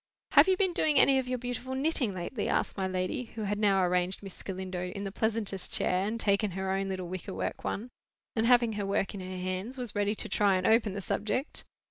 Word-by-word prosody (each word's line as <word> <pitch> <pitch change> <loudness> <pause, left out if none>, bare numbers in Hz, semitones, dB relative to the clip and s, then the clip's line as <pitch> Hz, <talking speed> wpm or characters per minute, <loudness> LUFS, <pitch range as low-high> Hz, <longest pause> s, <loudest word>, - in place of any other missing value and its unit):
"Have 290 +5 +7
you 375 -1 +3
been 375 -2 +2
doing 305 -3 +2
any 270 0 +6
of 260 - -3
your 255 0 -1
beautiful 245 +1 -4
knitting 270 -5 +1
lately?" 190 +5 -3
asked - - 0
my 190 -1 -1
lady, 185 +6 -2
who 220 - -3
had 205 0 -1
now 195 -3 +3
arranged 180 +2 0
Miss 195 -2 -6
Galindo 185 -1 -4
in 200 +2 -5
the 195 - -4
pleasantest 210 -3 -1
chair, 185 +2 +2
and 230 +2 -2
taken 205 0 +2
her 190 0 -1
own 195 0 -1
little 185 -2 -3
wicker 185 +2 -6
work - - -3
one, 235 +5 -3 0.4
and, 225 0 +2
having 240 -2 +5
her 205 -1 -2
work 195 -1 0
in 200 - -6
her 185 0 -6
hands, 185 +7 -3
was 245 -4 -5
ready 205 +1 +1
to - - -3
try 200 -2 +3
and 185 0 -1
open 220 -3 +4
the 200 - -4
subject. 220 +9 -2
205 Hz, 230 wpm, -30 LUFS, 190-240 Hz, 0.4 s, Have